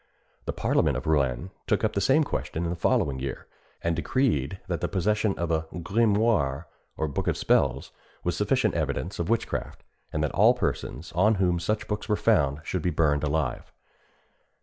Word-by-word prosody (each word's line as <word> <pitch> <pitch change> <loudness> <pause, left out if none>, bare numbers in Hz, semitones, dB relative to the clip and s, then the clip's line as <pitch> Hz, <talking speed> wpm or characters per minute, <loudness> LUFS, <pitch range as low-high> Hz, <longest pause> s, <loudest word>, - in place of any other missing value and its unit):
The - - -1
parliament - - +1
of - - -6
Rouen 75 +2 +1 0.2
took - - +1
up 110 -1 +1
the 100 - 0
same 140 +6 +4
question 85 - -3
in 85 - -1
the - - -2
following 70 -5 +1
year, 65 0 -5 0.4
and 85 0 +1
decreed 95 - 0
that 85 -4 -2
the - - 0
possession 105 +2 0
of 85 -1 -2
a 80 0 0
grimoire, 100 - +1 0.3
or 80 - 0
book 70 - -3
of - - +1
spells, 70 0 +1 0.3
was - - 0
sufficient - - +1
evidence 85 +9 -2
of 85 - -2
witchcraft, 115 0 -2 0.3
and 75 - -1
that 75 - 0
all - - +5
persons 75 +7 -3
on 105 +5 +3
whom 90 -3 +1
such 105 +5 -2
books 105 +1 -4
were 105 - +3
found 75 -11 +2
should 90 +1 -2
be 90 - 0
burned 75 -4 +1
alive. 75 -3 -1
85 Hz, 180 wpm, -27 LUFS, 75-105 Hz, 0.4 s, all